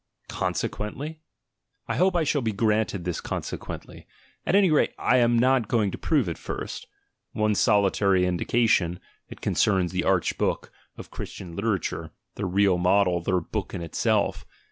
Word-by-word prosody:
"Consequently?" 145 +9 -3 0.7
I - - -2
hope 185 +1 +3
I 170 - +3
shall 145 -1 +1
be 115 -2 0
granted 105 -2 0
this 90 -2 -2
"consequently"; - - -6 0.4
at - - +3
any 195 -4 +5
rate, 150 - +3
I 125 - +3
am 120 -1 +3
not 125 -1 +3
going 105 -4 +1
to - - -6
prove 145 - +1
it 85 - -4
first. - - -6 0.5
One 110 0 +1
solitary 100 -3 +3
indication, 90 -1 +1 0.3
it - - -11
concerns 95 -4 +1
the 90 -1 -1
arch 95 -3 +1
book - - -1 0.3
of - - -10
Christian 85 -3 -8
literature, 100 -3 -2 0.2
their 100 - -3
real 95 0 +3
model, 90 -1 +3
their 90 +1 0
"book - - -5
in 85 - -4
itself." 80 - 0
100 Hz, 155 wpm, -25 LUFS, 90-120 Hz, 0.7 s, any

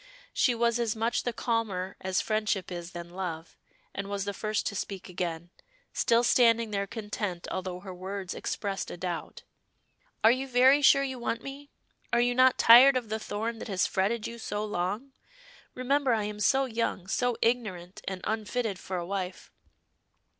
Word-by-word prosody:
She 250 -4 +3
was 235 0 +1
as 230 -2 0
much 225 +2 0
the 245 - +1
calmer 215 -6 -2
as 185 -1 0
friendship 215 -4 -1
is 175 -1 -5
than 170 0 -7
love, 175 -3 -5 0.4
and 200 0 -5
was 200 -1 -2
the 200 - -3
first 215 +1 -2
to 200 - -2
speak 195 -1 -5
again, 175 -2 -4 0.4
still 235 -1 +3
standing 230 -2 +4
there 200 -1 -1
content 205 -5 -4
although 185 -1 -4
her 190 -1 -8
words 190 +1 -5
expressed 195 -2 -3
a - - -7
doubt. 175 -1 -5 0.8
"Are 220 - +8
you 260 +2 -1
very 260 +3 +5
sure 275 0 +6
you 265 -2 -4
want 235 -1 -2
me? 280 +1 -8 0.4
Are 240 - +3
you 245 0 +3
not 255 +1 +5
tired 255 +3 +8
of 240 -4 -4
the 220 +1 -2
thorn 225 +2 -4
that - - -6
has 190 -3 +1
fretted 210 +4 0
you 235 0 -6
so 210 -1 -3
long? 210 +7 -3 0.6
Remember, 260 0 +2
I 215 - -1
am 210 0 -5
so 270 +5 +3
young, 230 -6 -2
so 245 +5 0
ignorant, 205 -7 -1
and 190 -1 -4
unfitted 220 -2 -2
for 185 - -4
a 175 - -3
wife. 185 -1 -5
215 Hz, 175 wpm, -29 LUFS, 190-240 Hz, 0.8 s, Are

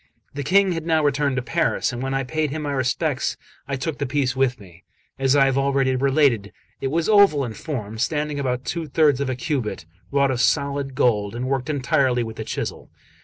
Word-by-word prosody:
The 145 - -4
King 190 +6 +3
had 165 -2 -3
now 160 -2 +2
returned 145 -1 +1
to 125 - -1
Paris; 165 -3 0
and 120 - -5
when 135 0 -2
I 135 - 0
paid 155 +3 -1
him 155 +2 -4
my 145 - -2
respects, 130 +2 -1 0.3
I 140 - -2
took 140 +2 -4
the 140 - -1
piece 130 -1 0
with 130 -2 +1
me. 90 -3 -16 0.4
As 135 +1 +3
I 140 -1 +5
have 135 0 +1
already 135 -1 +1
related, 135 -6 +2 0.3
it - - -1
was 160 +4 0
oval 200 -10 +5
in 115 - -5
form, 110 -7 -5
standing 150 +2 -1
about 130 -2 -2
two 165 -2 -3
thirds 145 -1 +3
of 140 - -1
a 130 - -1
cubit, 120 - -3 0.3
wrought 140 -1 +3
of 125 -1 -1
solid 140 0 0
gold, 105 -4 +1
and 120 +1 -3
worked 135 +1 -1
entirely 135 -4 +1
with 110 -1 -7
the 110 - -4
chisel. - - -5
135 Hz, 215 wpm, -23 LUFS, 125-150 Hz, 0.4 s, I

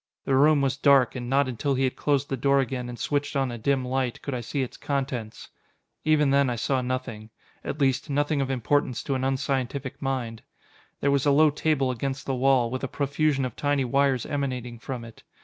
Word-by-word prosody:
The 135 - 0
room 145 +2 +5
was 135 0 0
dark, 140 -4 +4
and 120 -1 -5
not 140 +1 +3
until 130 +3 -1
he 130 - 0
had 130 - 0
closed 145 -1 0
the 135 - 0
door 140 +2 +2
again 125 -1 -2
and 120 - -7
switched 145 +2 -2
on 135 -2 +1
a 120 - -6
dim 135 +2 +1
light, 130 -1 -1
could 140 - -4
I 125 - -2
see 135 +4 -2
its 125 - -7
contents. 130 -6 -4 0.5
Even 150 -2 +3
then 140 -1 +3
I 120 - -1
saw 130 +3 0
nothing. 125 -4 -4 0.3
At 150 - -5
least, 135 +1 +1
nothing 145 +1 +1
of 135 - -2
importance 130 -1 0
to 140 - -2
an 130 -1 -1
unscientific 135 -1 -2
mind. 125 -4 -3 0.6
There 140 - +2
was 140 0 +2
a - - +5
low 150 +2 +5
table 145 -3 +1
against 135 +2 -4
the 135 - -1
wall, 130 -2 +2
with 130 +1 -4
a - - 0
profusion 140 0 0
of 125 - -5
tiny 145 -2 0
wires 135 0 +1
emanating 125 -4 -3
from 120 0 -6
it. 115 - -13
135 Hz, 215 wpm, -26 LUFS, 125-140 Hz, 0.6 s, room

